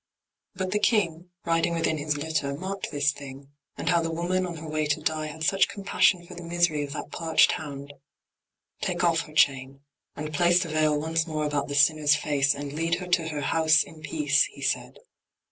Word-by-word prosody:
But 185 Hz, 0 st, -3 dB
the 210 Hz, -, +1 dB
King, 180 Hz, -6 st, +1 dB, 0.2 s
Riding 165 Hz, 0 st, +1 dB
within 165 Hz, -1 st, 0 dB
his 150 Hz, 0 st, -1 dB
litter, 145 Hz, -2 st, -2 dB
marked 190 Hz, +5 st, -5 dB
this 145 Hz, -1 st, +1 dB
thing, 140 Hz, 0 st, -11 dB, 0.3 s
And -, -, -2 dB
how 170 Hz, -1 st, +3 dB
the 165 Hz, -, -2 dB
woman, 180 Hz, +3 st, -1 dB
on 170 Hz, -, -6 dB
her 160 Hz, +1 st, -8 dB
way 155 Hz, 0 st, -1 dB
to 145 Hz, -, 0 dB
die 155 Hz, -1 st, -2 dB
Had 160 Hz, +1 st, -7 dB
such 195 Hz, +4 st, +3 dB
compassion 195 Hz, -3 st, +1 dB
for 180 Hz, -, -11 dB
the 175 Hz, -, -9 dB
misery 170 Hz, -3 st, 0 dB
Of 140 Hz, 0 st, -6 dB
that -, -, -6 dB
parched 165 Hz, -1 st, +3 dB
hound: 140 Hz, -2 st, -6 dB, 0.9 s
"Take -, -, -2 dB
off 165 Hz, -2 st, +3 dB
her 155 Hz, -, -14 dB
chain, 135 Hz, -2 st, +2 dB, 0.3 s
and 155 Hz, +1 st, -6 dB
place 175 Hz, +4 st, +3 dB
The 170 Hz, -, -7 dB
veil 155 Hz, -1 st, +2 dB
once 160 Hz, +2 st, -1 dB
more 155 Hz, -1 st, -2 dB
about 145 Hz, -1 st, -1 dB
the 140 Hz, -, -4 dB
sinner's 150 Hz, 0 st, +4 dB
face, 145 Hz, -2 st, +1 dB
And 140 Hz, 0 st, -6 dB
lead 165 Hz, +2 st, 0 dB
her 180 Hz, +1 st, -6 dB
to 170 Hz, -2 st, +2 dB
her 150 Hz, -2 st, -4 dB
house 160 Hz, 0 st, +3 dB
in 155 Hz, -, -14 dB
peace!" 300 Hz, -, +2 dB
he -, -, -12 dB
said. -, -, -2 dB
155 Hz, 205 wpm, -26 LUFS, 145-170 Hz, 0.9 s, sinner's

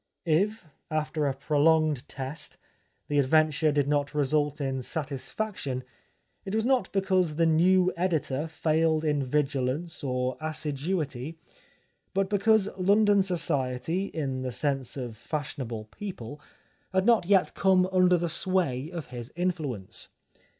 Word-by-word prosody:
If, 195 Hz, +6 st, +1 dB, 0.2 s
after 155 Hz, -1 st, -1 dB
a 135 Hz, -, 0 dB
prolonged 150 Hz, 0 st, +2 dB
test, 135 Hz, +4 st, -5 dB, 0.5 s
the 145 Hz, 0 st, +1 dB
adventure 155 Hz, +2 st, +3 dB
did 145 Hz, -1 st, +1 dB
not 145 Hz, 0 st, 0 dB
result 145 Hz, +1 st, +1 dB
in 135 Hz, -2 st, -2 dB
satisfaction, 140 Hz, -, -4 dB, 0.6 s
it 195 Hz, +2 st, -3 dB
was 220 Hz, 0 st, +1 dB
not 255 Hz, -7 st, +2 dB
because 185 Hz, -5 st, +1 dB
the 165 Hz, +1 st, +3 dB
new 180 Hz, +3 st, +4 dB
editor 160 Hz, -5 st, 0 dB
failed 160 Hz, 0 st, +1 dB
in 150 Hz, -2 st, +1 dB
vigilance 145 Hz, +3 st, -1 dB
or 125 Hz, -1 st, -1 dB
assiduity, 155 Hz, -1 st, -2 dB, 0.8 s
but 195 Hz, +1 st, +1 dB
be 205 Hz, -, +2 dB
cause 220 Hz, -1 st, +4 dB
London 205 Hz, +2 st, +4 dB
society, 165 Hz, -1 st, 0 dB
in 135 Hz, -8 st, -3 dB
the 130 Hz, -1 st, -3 dB
sense 135 Hz, 0 st, -2 dB
of 120 Hz, -4 st, -5 dB
fashionable 125 Hz, -4 st, -5 dB
people, 150 Hz, -, -7 dB, 0.5 s
had 190 Hz, +1 st, +2 dB
not 230 Hz, -6 st, +4 dB
yet 195 Hz, -2 st, +3 dB
come 185 Hz, -1 st, +3 dB
under 180 Hz, -1 st, +5 dB
the 170 Hz, 0 st, -1 dB
sway 160 Hz, -6 st, 0 dB
of 165 Hz, -7 st, -7 dB
his 120 Hz, +1 st, -7 dB
influence. 155 Hz, -, -3 dB
155 Hz, 130 wpm, -28 LUFS, 135-185 Hz, 0.8 s, under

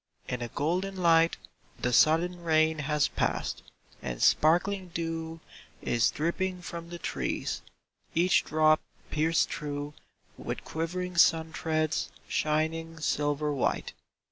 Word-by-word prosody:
In 125 Hz, -1 st, -3 dB
a 120 Hz, -, -2 dB
golden 180 Hz, +9 st, -1 dB
light 165 Hz, -2 st, +4 dB, 0.4 s
The 125 Hz, -, 0 dB
sudden 170 Hz, +7 st, +4 dB
rain 160 Hz, -1 st, +2 dB
has 150 Hz, 0 st, +1 dB
passed, -, -, -2 dB, 0.4 s
and -, -, -4 dB
sparkling 185 Hz, +4 st, +3 dB
dew 165 Hz, -1 st, -4 dB, 0.4 s
Is 115 Hz, -1 st, +2 dB
dripping 180 Hz, +3 st, -2 dB
from 170 Hz, -1 st, -7 dB
the 175 Hz, -, -6 dB
trees, -, -, -3 dB, 0.5 s
each 175 Hz, +3 st, +4 dB
drop 155 Hz, 0 st, +3 dB, 0.3 s
pierced 160 Hz, +2 st, +2 dB
through 145 Hz, 0 st, -4 dB, 0.5 s
With -, -, -5 dB
quivering 180 Hz, +2 st, -3 dB
sun 160 Hz, -1 st, +4 dB
threads, 155 Hz, -1 st, 0 dB, 0.2 s
shining 160 Hz, +2 st, -1 dB
sil 145 Hz, -1 st, +1 dB
ver 150 Hz, 0 st, -1 dB
white. 140 Hz, -3 st, -1 dB
160 Hz, 120 wpm, -29 LUFS, 150-170 Hz, 0.5 s, light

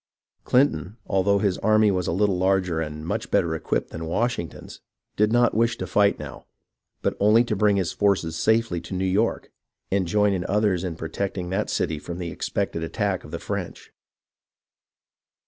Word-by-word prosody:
Clinton, 110 Hz, -, +2 dB
although 100 Hz, +1 st, +2 dB
his 100 Hz, -2 st, 0 dB
army 110 Hz, 0 st, +4 dB
was 90 Hz, -2 st, -1 dB
a -, -, 0 dB
little 95 Hz, +1 st, +1 dB
larger 95 Hz, -3 st, +1 dB
and 75 Hz, 0 st, -5 dB
much 85 Hz, -, -3 dB
better 85 Hz, -1 st, +2 dB
equipped 80 Hz, -, -2 dB
than 80 Hz, 0 st, -6 dB
Washington's, 90 Hz, -, -3 dB, 0.3 s
did 105 Hz, +1 st, +2 dB
not 120 Hz, +1 st, +3 dB
wish 115 Hz, +1 st, +1 dB
to 95 Hz, -, -4 dB
fight 100 Hz, +2 st, +3 dB
now, -, -, -9 dB, 0.6 s
but -, -, 0 dB
only 105 Hz, +3 st, +5 dB
to 115 Hz, -3 st, -2 dB
bring 105 Hz, 0 st, +3 dB
his 95 Hz, -4 st, 0 dB
forces 95 Hz, -5 st, +1 dB
safely 110 Hz, -1 st, +1 dB
into 85 Hz, +3 st, -7 dB
New 95 Hz, +1 st, -1 dB
York, 100 Hz, +5 st, 0 dB, 0.4 s
and 95 Hz, -2 st, +1 dB
join 105 Hz, +2 st, +2 dB
with 95 Hz, -, -1 dB
others 100 Hz, -3 st, +1 dB
in 90 Hz, -3 st, -3 dB
protecting 90 Hz, +2 st, -4 dB
that 100 Hz, +3 st, -1 dB
city 80 Hz, -2 st, -1 dB
from 85 Hz, +3 st, -7 dB
the 85 Hz, -2 st, -4 dB
expected 80 Hz, +2 st, -2 dB
attack 80 Hz, -, -2 dB
of -, -, -11 dB
the -, -, -4 dB
French. -, -, -6 dB
95 Hz, 175 wpm, -24 LUFS, 85-105 Hz, 0.6 s, only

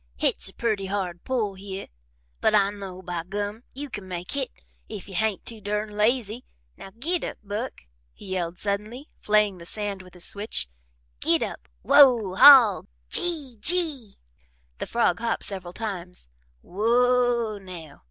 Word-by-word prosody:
"Hit's -, -, +1 dB
a -, -, -15 dB
purty 215 Hz, -4 st, -1 dB
hard 185 Hz, -3 st, -3 dB
pull 230 Hz, -6 st, -1 dB
hyeh, 195 Hz, 0 st, -7 dB, 0.5 s
but 215 Hz, -, +3 dB
I 200 Hz, -1 st, +3 dB
know, 190 Hz, -2 st, -9 dB
by 175 Hz, -2 st, -4 dB
Gum, 205 Hz, +4 st, -4 dB
you 290 Hz, +2 st, -5 dB
can 205 Hz, -7 st, -8 dB
make 180 Hz, -1 st, -5 dB
hit 275 Hz, -2 st, -2 dB, 0.4 s
if 210 Hz, -4 st, -8 dB
you 195 Hz, -, -9 dB
hain't 210 Hz, +2 st, -1 dB
too 225 Hz, -2 st, -6 dB
durn 210 Hz, +1 st, -3 dB
lazy. 225 Hz, +2 st, 0 dB, 0.3 s
Now, -, -, -11 dB
git 335 Hz, +8 st, 0 dB
up, -, -, -5 dB
Buck!" 210 Hz, +5 st, -5 dB, 0.3 s
he -, -, -14 dB
yelled 175 Hz, -2 st, -3 dB
suddenly, 210 Hz, -, -4 dB
flaying 210 Hz, -3 st, +2 dB
the 170 Hz, -, -11 dB
sand 205 Hz, -2 st, -4 dB
with 185 Hz, 0 st, -16 dB
his 175 Hz, -, -2 dB
switch. 205 Hz, -, -2 dB, 0.5 s
"Git -, -, +3 dB
up -, -, -7 dB, 0.2 s
Whoa 245 Hz, -9 st, +6 dB
Haw 235 Hz, -2 st, +8 dB, 0.3 s
Gee, 295 Hz, -9 st, +1 dB
Gee!" 305 Hz, -, +4 dB, 0.6 s
The -, -, -4 dB
frog 235 Hz, -1 st, +1 dB
hopped 230 Hz, 0 st, -1 dB
several 185 Hz, -3 st, -6 dB
times. 180 Hz, -, -5 dB, 0.3 s
"Whoa, 235 Hz, +1 st, +1 dB
now!" 175 Hz, -6 st, -11 dB
210 Hz, 155 wpm, -25 LUFS, 190-235 Hz, 0.6 s, Haw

